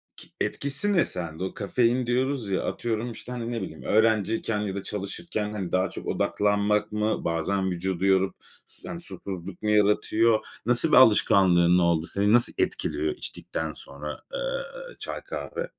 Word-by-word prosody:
ki -, -, -14 dB
etkisi 140 Hz, +9 st, -1 dB
ne 175 Hz, -, +4 dB
sende? 85 Hz, -1 st, -5 dB
O 95 Hz, -, -3 dB
"kafein" 120 Hz, +4 st, +1 dB
diyoruz 125 Hz, -2 st, 0 dB
ya, 95 Hz, -, 0 dB
atıyorum, 115 Hz, +1 st, -2 dB
işte, 120 Hz, +2 st, -9 dB
hani, 120 Hz, -1 st, -4 dB
ne 115 Hz, -3 st, -2 dB
bileyim 80 Hz, -4 st, -7 dB
öğrenciyken 110 Hz, 0 st, +2 dB
ya 100 Hz, -2 st, -3 dB
da 100 Hz, -, -4 dB
çalışırken, 105 Hz, +1 st, -4 dB
hani, 95 Hz, -4 st, -4 dB
daha 95 Hz, +1 st, +2 dB
çok -, -, -8 dB
odaklanmak 105 Hz, +1 st, +1 dB
mı? 105 Hz, +1 st, -1 dB
Bazen 95 Hz, +3 st, 0 dB
vücudu 95 Hz, +1 st, -2 dB
yorup 95 Hz, 0 st, +3 dB, 0.3 s
su -, -, -14 dB
yani, -, -, -6 dB
susuzluk 95 Hz, -1 st, -7 dB
mu 105 Hz, -, -1 dB
yaratıyor? 105 Hz, +2 st, +3 dB, 0.2 s
Nasıl 125 Hz, +7 st, +2 dB
bir -, -, +7 dB
alışkanlığın 90 Hz, -7 st, +6 dB
oldu? 85 Hz, -2 st, +2 dB
Seni 100 Hz, +2 st, +1 dB
nasıl 120 Hz, 0 st, +5 dB
etkiliyor 75 Hz, 0 st, -1 dB
içtikten 80 Hz, -1 st, -4 dB
sonra, 75 Hz, +2 st, -8 dB
eee, -, -, -4 dB
çay, -, -, -5 dB
kahve? 485 Hz, +1 st, -5 dB
105 Hz, 160 wpm, -26 LUFS, 95-120 Hz, 0.3 s, bir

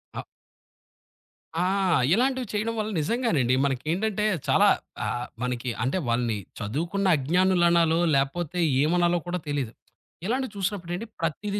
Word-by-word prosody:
ఆ! -, -, -4 dB, 1.3 s
ఆ! 170 Hz, -, +1 dB, 0.5 s
ఇలాంటివి 255 Hz, +3 st, +1 dB
చేయడం 215 Hz, +2 st, -1 dB
వల్ల 215 Hz, 0 st, -1 dB
నిజంగానండి 155 Hz, -, +1 dB
మనకేంటంటే, 180 Hz, -, -1 dB, 0.2 s
చాలా -, -, +5 dB, 0.4 s
ఆహ్, 120 Hz, 0 st, -2 dB, 0.2 s
మనకి 125 Hz, 0 st, -2 dB
అంటే 130 Hz, +8 st, 0 dB
వాళ్ళని 115 Hz, -2 st, 0 dB, 0.2 s
చదువుకున్న 170 Hz, -, -1 dB
అజ్ఞానులనాలో 170 Hz, +1 st, +3 dB, 0.2 s
లేపోతే 150 Hz, +5 st, -1 dB, 0.2 s
ఏమనాలో 175 Hz, +2 st, +2 dB
కూడా 180 Hz, +1 st, -2 dB
తెలీదు. 140 Hz, -6 st, -2 dB, 0.5 s
ఇలాంటివి 255 Hz, +3 st, -1 dB
చూసినప్పుడండి, 190 Hz, 0 st, -3 dB
ప్రతీదీ 200 Hz, +6 st, -2 dB
175 Hz, 110 wpm, -26 LUFS, 140-205 Hz, 1.3 s, చాలా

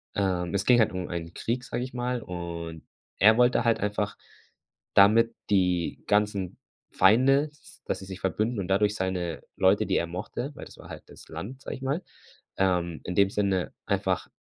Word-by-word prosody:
Ähm, 90 Hz, -3 st, 0 dB
es 100 Hz, +1 st, 0 dB
ging 120 Hz, -1 st, +6 dB
halt 110 Hz, -, +4 dB
um 90 Hz, -1 st, -4 dB
einen 85 Hz, -1 st, -5 dB
Krieg, 125 Hz, +2 st, -2 dB
sage 125 Hz, -, -3 dB
ich 130 Hz, -, -7 dB
mal, 125 Hz, -1 st, -2 dB
und 85 Hz, -3 st, -6 dB, 0.3 s
er 110 Hz, +3 st, +6 dB
wollte 120 Hz, -1 st, +4 dB
halt 115 Hz, -1 st, +2 dB
einfach 105 Hz, 0 st, -2 dB, 0.8 s
damit 115 Hz, +3 st, +6 dB
die 90 Hz, -4 st, +1 dB
ganzen 105 Hz, -3 st, +1 dB, 0.3 s
Feinde, 135 Hz, +9 st, +4 dB
s 150 Hz, -, -26 dB
s -, -, -17 dB
dass -, -, -2 dB
sie 95 Hz, -, -9 dB
sich 95 Hz, -1 st, -8 dB
verbünden 110 Hz, +4 st, -1 dB
und 90 Hz, -, -3 dB
dadurch 105 Hz, +2 st, +2 dB
seine 90 Hz, -3 st, -2 dB, 0.2 s
Leute, 100 Hz, +3 st, +4 dB
die 95 Hz, -, +2 dB
er 85 Hz, -, +1 dB
mochte 110 Hz, -, -5 dB
weil -, -, -8 dB
das -, -, -14 dB
war -, -, -13 dB
halt -, -, -8 dB
das -, -, -15 dB
Land, 130 Hz, +6 st, -7 dB
sage -, -, -5 dB
ich -, -, -16 dB
mal. 140 Hz, +7 st, -1 dB, 0.5 s
Ähm, 90 Hz, -3 st, 0 dB
in 90 Hz, -, -4 dB
dem 100 Hz, -1 st, +4 dB
Sinne 100 Hz, -3 st, 0 dB
einfach, -, -, 0 dB
100 Hz, 190 wpm, -27 LUFS, 90-115 Hz, 0.8 s, ging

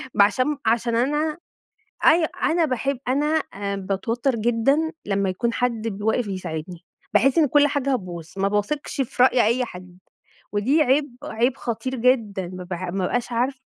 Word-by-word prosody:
ما 205 Hz, -, +7 dB
عشان 260 Hz, +7 st, 0 dB
عشان 230 Hz, +1 st, +1 dB
أنا 295 Hz, +6 st, 0 dB, 0.7 s
أي 325 Hz, 0 st, +6 dB, 0.2 s
أنا 335 Hz, 0 st, +3 dB
باحب 270 Hz, 0 st, -1 dB
أنا 300 Hz, +4 st, +2 dB
آآ، 200 Hz, 0 st, -3 dB
باتوتر 225 Hz, +7 st, -1 dB
جدًا 240 Hz, +8 st, +1 dB
لمّا 195 Hz, -1 st, 0 dB
يكون 235 Hz, +6 st, -1 dB
حد 230 Hz, -2 st, -1 dB
ب 205 Hz, -1 st, -6 dB
واقف 220 Hz, +2 st, +1 dB
يساعدني، 175 Hz, -2 st, -6 dB, 0.3 s
باحس 270 Hz, +5 st, +4 dB
إن 310 Hz, -, +5 dB
كُلّ 290 Hz, +2 st, +5 dB
حاجة 275 Hz, -1 st, 0 dB
هتبوظ، 175 Hz, -7 st, -5 dB
ما 195 Hz, 0 st, +1 dB
باثقش 210 Hz, +9 st, -2 dB
في 250 Hz, 0 st, 0 dB
رأي 250 Hz, -1 st, +4 dB
أي 245 Hz, +3 st, +2 dB
حد، 180 Hz, -4 st, -11 dB, 0.5 s
ودي 255 Hz, +10 st, +3 dB
عيب، 275 Hz, -1 st, +1 dB
عيب 245 Hz, +4 st, 0 dB
خطير 245 Hz, +3 st, -4 dB
جدًا، 225 Hz, -7 st, +1 dB
ما 180 Hz, 0 st, -7 dB
ب 180 Hz, -, -9 dB
ما 180 Hz, 0 st, -4 dB, 0.2 s
بابقاش 245 Hz, +3 st, -2 dB
عارفة 255 Hz, +3 st, -1 dB
235 Hz, 165 wpm, -23 LUFS, 200-275 Hz, 0.7 s, ما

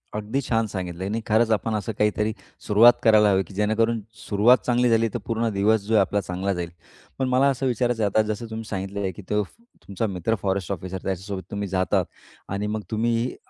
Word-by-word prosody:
अगदी 110 Hz, +6 st, -2 dB
छान 115 Hz, -3 st, 0 dB
सांगितलंय 95 Hz, -1 st, -5 dB
आणि 110 Hz, +3 st, -1 dB
खरंच 110 Hz, +1 st, +3 dB
आपण 110 Hz, +1 st, 0 dB
असं 105 Hz, +2 st, -3 dB
काहीतरी 105 Hz, +1 st, +1 dB, 0.3 s
सुरुवात 115 Hz, +3 st, +7 dB
करायला 110 Hz, -2 st, +6 dB
हवी, 95 Hz, 0 st, +2 dB
की 100 Hz, -, -15 dB
जेणेकरून 110 Hz, +2 st, +1 dB, 0.3 s
सुरुवात 110 Hz, +5 st, +5 dB
चांगली 125 Hz, 0 st, +2 dB
झाली 115 Hz, 0 st, +3 dB
तर -, -, -2 dB
पूर्ण 115 Hz, 0 st, 0 dB
दिवस 105 Hz, +2 st, +2 dB
जो 110 Hz, +3 st, -3 dB
आहे 105 Hz, -, +6 dB
आपला 100 Hz, +2 st, 0 dB
चांगला 95 Hz, +2 st, -2 dB
जाईल. 85 Hz, -1 st, -4 dB, 0.5 s
पण 130 Hz, -, +1 dB
मला 130 Hz, +2 st, +4 dB
असं 135 Hz, 0 st, -2 dB
विचारायचं 120 Hz, -2 st, 0 dB
आहे 100 Hz, -, +2 dB
आता -, -, +7 dB
जसं 110 Hz, +2 st, -3 dB
तुम्ही 110 Hz, 0 st, -6 dB
सांगितलंय, 95 Hz, 0 st, -3 dB
की 100 Hz, -, -11 dB
तो 105 Hz, 0 st, +1 dB
तुमचा 110 Hz, -, -7 dB
मित्र 95 Hz, +4 st, -1 dB
फॉरेस्ट 95 Hz, -1 st, -1 dB
ऑफिसर 95 Hz, 0 st, -4 dB
त्याच्यासोबत 95 Hz, +1 st, -4 dB
तुम्ही 100 Hz, 0 st, -3 dB
जातात 95 Hz, -2 st, +1 dB, 0.4 s
आणि 100 Hz, +2 st, -2 dB
मग 105 Hz, 0 st, -2 dB
तुम्ही 115 Hz, +2 st, 0 dB
105 Hz, 200 wpm, -24 LUFS, 100-115 Hz, 0.5 s, सुरुवात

